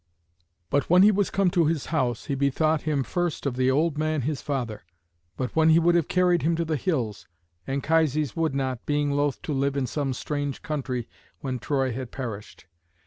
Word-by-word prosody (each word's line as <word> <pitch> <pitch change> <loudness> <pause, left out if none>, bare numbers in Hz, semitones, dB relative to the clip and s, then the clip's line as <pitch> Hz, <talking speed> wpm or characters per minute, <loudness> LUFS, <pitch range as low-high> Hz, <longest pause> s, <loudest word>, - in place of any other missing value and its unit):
But 140 - +1
when 180 +2 +7
he 210 - +7
was 200 -1 +1
come 195 -2 +2
to 170 -3 +3
his 160 -2 -1
house 125 -7 0
he 140 - -2
bethought 140 +3 +1
him 150 -3 0
first 175 +1 -2
of 135 -3 -1
the 130 0 +2
old 150 +3 +1
man 155 -1 0
his 145 +1 -2
father; 125 - -3 0.5
but 130 -1 -3
when 160 0 +5
he 160 - +6
would 170 +1 +4
have 170 -3 +2
carried 180 -1 +3
him 165 +2 +1
to 165 0 -1
the 160 -1 -1
hills, 120 - -2 0.4
Anchises 150 0 +1
would 160 -4 0
not, 130 -3 -2
being 145 -1 +1
loath 145 -1 0
to 160 -4 -3
live 140 +1 0
in 135 - +1
some 135 +1 -2
strange 145 +1 -4
country 130 -6 -3 0.3
when 130 -3 -3
Troy 135 +2 0
had 125 +1 -5
perished. 110 -10 -7
145 Hz, 195 wpm, -26 LUFS, 130-160 Hz, 0.5 s, when